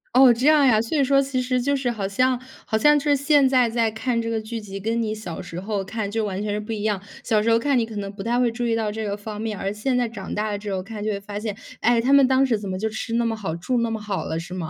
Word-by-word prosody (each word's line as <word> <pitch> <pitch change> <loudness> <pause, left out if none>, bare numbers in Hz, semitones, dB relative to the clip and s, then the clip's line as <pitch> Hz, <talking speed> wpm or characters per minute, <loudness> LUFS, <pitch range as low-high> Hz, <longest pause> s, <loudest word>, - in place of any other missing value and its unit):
哦， 255 -2 +8
这 250 +5 0
样 300 -2 +6
呀。 220 -3 +4
所 235 +7 -2
以 280 - +4
说 275 +1 +4
其 265 -2 -1
实 250 0 0
就 280 +3 +1
是 260 -2 -1
好 210 -4 -3
像 255 +5 +1 0.3
好 220 - 0
像 295 +5 +5
是 290 0 +2
现 285 -1 +4
在 255 -3 +3
再 230 -1 +1
看 230 +2 -1
这 230 - -3
个 225 -1 -1
剧 225 +1 -5
集， 195 -2 -8
跟 225 +3 -1
你 215 -1 -2
小 185 -6 -6
时 175 -1 -7
候 200 0 -2
看 205 +1 -4
就 220 -1 -1
完 195 0 -3
全 210 - -2
是 210 - -1
不 215 +2 -5
一 210 -1 -4
样。 205 -3 0 0.2
小 215 -3 +2
时 230 - +1
候 230 - +5
看 275 +2 +1
你 225 - +1
可 225 -1 -10
能 200 -1 -4
不 200 -1 -9
太 235 +3 0
会 240 -2 +2
注 240 +1 -3
意 230 -1 +1
到 220 -2 -1
这 220 +1 -4
个 200 0 -2
方 210 +1 -7
面， 220 -3 -3
而 195 +1 -2
现 250 +5 -1
在 245 -1 +1
长 195 -4 -7
大 215 +1 -1
了 205 - -2
之 205 -1 -5
后 185 -1 -2
看 215 0 -8
就 215 - -1
会 200 - -3
发 205 +1 -6
现， 210 -2 -4 0.2
哎， 235 0 +3
他 260 +3 +1
们 280 -2 +7
当 265 +1 +4
时 225 -5 +1
怎 200 -2 -6
么 185 - -3
就 220 +3 -1
吃 225 +2 -5
那 235 0 +2
么 225 -1 0
好， 165 -6 -4
住 240 +8 -1
那 230 -1 0
么 220 -1 -3
好 205 -2 -3
了， 160 - -3
是 180 +2 -8
吗？ 170 -4 -4
225 Hz, 350 characters per minute, -23 LUFS, 205-250 Hz, 0.3 s, 哦